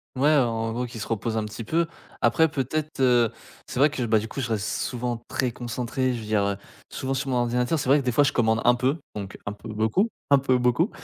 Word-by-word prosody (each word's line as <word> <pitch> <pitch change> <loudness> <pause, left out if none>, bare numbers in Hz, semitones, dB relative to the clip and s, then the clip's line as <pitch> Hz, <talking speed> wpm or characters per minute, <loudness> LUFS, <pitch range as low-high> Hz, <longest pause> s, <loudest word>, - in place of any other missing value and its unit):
Ouais, 145 +4 +4
en 115 -4 +1
gros 125 +1 -2
qui 115 -1 -9
se 110 - -5
repose 115 0 -2
un 110 - 0
petit 110 +2 -7
peu. 165 +9 +1 0.4
Après 120 +8 +4
peut-être, 150 +2 -3
heu, 120 -3 +4 0.4
c'est - - -4
vrai 145 +2 +5
que 140 - -4
bah, 110 -1 +3
du 110 +1 -2
coup 135 - -5
je 120 - -3
reste 110 -1 -1
souvent 120 -1 -2
très 130 -2 -1
concentré, 125 +2 -2
je 120 - -4
veux - - -8
dire, 105 -1 +1
heu, 100 0 0 0.4
souvent 135 0 -3
sur 135 +1 -2
mon 125 - +1
ordinateur. 125 +5 +1
C'est 135 - -3
vrai 145 +2 +6
que - - -3
des 125 - +2
fois 145 +5 +4
je 145 - +1
commande 110 -2 +2
un 120 - +7
peu, 130 +5 +1 0.2
donc 100 -2 -6
un 105 - -3
peu 105 +2 -11
beaucoup, 110 - +1 0.2
un 140 - +7
peu 130 -1 +2
beaucoup, 125 - +2
125 Hz, 255 wpm, -25 LUFS, 115-135 Hz, 0.4 s, un